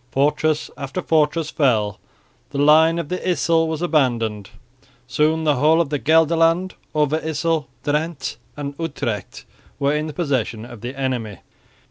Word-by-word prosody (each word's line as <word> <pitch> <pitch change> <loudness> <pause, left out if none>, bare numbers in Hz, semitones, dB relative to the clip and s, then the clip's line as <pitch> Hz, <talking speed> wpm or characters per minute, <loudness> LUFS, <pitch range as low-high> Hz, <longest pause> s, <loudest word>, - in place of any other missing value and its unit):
Fortress 150 +2 +1
after 140 +4 -4
fortress 155 -1 +1
fell; 105 -8 +1 0.5
the 140 - -6
line 155 +3 +5
of 170 -4 -4
the 180 - -2
Yssel 165 -2 +1
was 160 +1 -3
abandoned. 115 - 0 0.6
Soon 155 +5 +1
the 150 -3 +2
whole 155 +5 +4
of 165 -4 +1
Gelderland, 165 +4 +2 0.2
Overyssel, 155 0 0 0.2
Drente 150 -1 -2 0.2
and 145 -1 -4
Utrecht 120 - -4 0.3
were 140 0 +1
in 150 +1 -1
the 155 - -6
possession 130 -9 -2
of 120 -3 -11
the 130 +3 -6
enemy. 120 -6 -2
150 Hz, 135 wpm, -21 LUFS, 130-160 Hz, 0.6 s, line